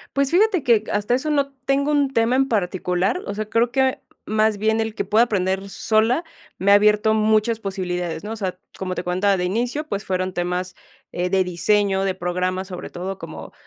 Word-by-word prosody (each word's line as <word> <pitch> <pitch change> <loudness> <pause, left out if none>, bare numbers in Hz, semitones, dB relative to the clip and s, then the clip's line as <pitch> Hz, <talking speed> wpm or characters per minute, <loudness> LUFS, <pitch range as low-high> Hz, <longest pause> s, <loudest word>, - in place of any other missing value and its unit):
Pues, 275 -1 +1
fíjate 380 -2 +3
que, 220 -3 +3
hasta 205 +3 0
eso, 260 +5 0
no 280 -2 0
tengo 280 +2 +1
un 285 -2 +1
tema 230 +2 +2
en 270 0 +2
particular, 185 - 0
o - - -4
sea, 215 0 -4
creo 230 +1 +2
que 265 -1 +2 0.3
más 215 0 +1
bien, 220 +2 +1
el 220 -1 -2
que - - -1
pueda 220 +3 +4
aprender 195 -2 -1
sola, 225 - +1 0.3
me 200 +2 +2
ha - - +9
abierto 210 +1 +4
muchas 220 +1 +2
posibilidades, 180 -4 -3
¿no?, 210 - -5
o 225 - -3
sea, 185 -3 -3 0.2
como 185 -1 -3
te 175 - -3
contaba, 185 +3 +1
de 180 - -2
inicio, 240 +11 -1
pues, 200 0 -3
fueron 185 0 -1
temas, 180 +1 -2 0.4
eh, 180 +1 -2
de 190 0 +3
diseño, 195 +2 +1
de 190 -1 -1
programas, 185 +1 -2
sobre 180 -1 -7
todo, 185 +2 -5
como, - - -9
210 Hz, 200 wpm, -22 LUFS, 185-230 Hz, 0.4 s, ha